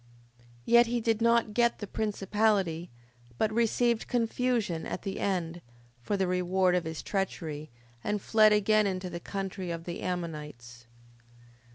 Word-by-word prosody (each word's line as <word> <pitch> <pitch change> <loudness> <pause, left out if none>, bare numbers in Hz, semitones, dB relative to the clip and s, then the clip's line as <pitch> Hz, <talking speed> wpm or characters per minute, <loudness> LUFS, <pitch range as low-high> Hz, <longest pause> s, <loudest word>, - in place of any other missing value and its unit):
5:7. - - -26 0.2
Yet 235 0 +6
he 240 +1 0
did 225 -1 0
not 235 -2 +3
get 235 +1 +2
the 210 - -5
principality, 200 -4 0 0.5
but 215 0 +1
received 235 0 +1
confusion 230 -7 0
at - - -5
the 195 - -4
end, 175 -3 -2 0.4
for 205 +11 -1
the 190 - +1
reward 180 0 +1
of 180 -2 +1
his 160 -1 -5
treachery, 160 -6 -3 0.3
and 210 0 -1
fled 215 +1 +5
again 210 0 +3
into 185 -1 -3
the 170 - -5
country 190 0 -5
of 165 -1 -4
the 175 0 -6
Ammonites. 150 -10 -6
195 Hz, 150 wpm, -29 LUFS, 170-220 Hz, 0.5 s, Yet